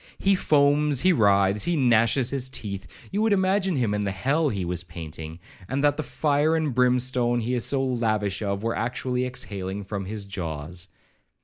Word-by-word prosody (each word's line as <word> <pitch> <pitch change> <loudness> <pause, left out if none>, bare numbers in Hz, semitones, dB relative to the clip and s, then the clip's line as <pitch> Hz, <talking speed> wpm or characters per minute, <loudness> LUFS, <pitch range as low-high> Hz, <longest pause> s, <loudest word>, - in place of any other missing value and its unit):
He 195 - +2
foams, 145 -4 +3
he 185 - +4
writhes, 100 - +3
he 175 - +1
gnashes 120 -2 +3
his 130 -2 -1
teeth; 100 -6 -5 0.2
you 200 +2 0
would 220 -1 +3
imagine 190 -1 +1
him 120 -6 0
in 105 0 -1
the 100 - -1
hell 140 +11 0
he 100 -6 -3
was 85 0 -2
painting, 80 -1 -8 0.3
and 135 +3 -1
that 145 -1 +4
the 155 - -2
fire 150 +2 +1
and 155 -4 0
brimstone 125 -1 +2
he 120 +3 -2
is 120 -2 +1
so 135 -1 +2
lavish 110 -6 -1
of, 100 0 -2
were 115 0 -1
actually 125 +2 -2
exhaling 100 -6 -5
from 100 -1 -5
his 105 +1 -5
jaws. 85 -2 -5
120 Hz, 185 wpm, -25 LUFS, 100-140 Hz, 0.3 s, he